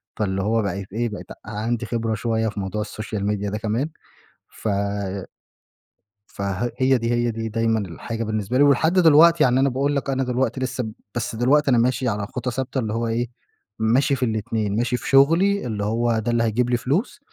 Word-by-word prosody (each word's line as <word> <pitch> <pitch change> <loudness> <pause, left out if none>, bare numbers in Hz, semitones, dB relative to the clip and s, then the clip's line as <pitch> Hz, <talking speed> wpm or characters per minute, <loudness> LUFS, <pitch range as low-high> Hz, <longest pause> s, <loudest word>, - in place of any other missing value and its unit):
فاللي 95 -2 -1
هو 110 +2 +1
بقيت 100 -1 -4
إيه 120 +2 -1
بقيت 105 - -8 0.2
عندي 115 +2 -2
خبرة 115 -2 -1
شويّة 110 +1 0
في 105 - -6
موضوع 95 +2 -3
السوشيال 105 -1 -4
ميديا 105 -1 -1
ده 105 - -3
كمان 110 +7 -1 0.6
ف - - -6 1.6
فها 100 +4 -3
هي 130 0 +3
دي 115 -1 -2
هي 120 0 +1
دي 115 0 -4
دايمًا 115 0 +1
الحاجة 110 +5 -5
بالنسبة 110 +2 -1
لي 140 - +6
ولحد 145 +4 +4
دلوقتي، 165 -2 +6
يعني 125 -1 +3
أنا 135 +1 +3
باقول 140 +3 0
لك 140 0 -2
أنا 135 0 0
دلوقتي 125 +1 -1
لسّه 125 -3 -3 0.2
بس 120 -1 -2
دلوقتي 140 +4 +3
أنا 125 - +4
ماشي 125 +2 +1
على 100 -3 -1
خُطى 125 +1 -4
ثابتة 130 +2 -3
اللي 110 -3 -2
هو 115 +1 -1
إيه، 115 +2 -1 0.5
ماشي 120 +6 +3
في 130 -1 0
الاتنين، 110 -2 -1
ماشي 120 +1 0
في - - -6
شغلي 165 +9 +4
اللي 105 -4 -3
هو 115 +1 +1
ده 110 +2 -1
اللي 120 0 +2
هيجيب 115 +2 +1
لي 120 - +2
فلوس، 155 - -1
115 Hz, 195 wpm, -23 LUFS, 110-130 Hz, 1.6 s, لي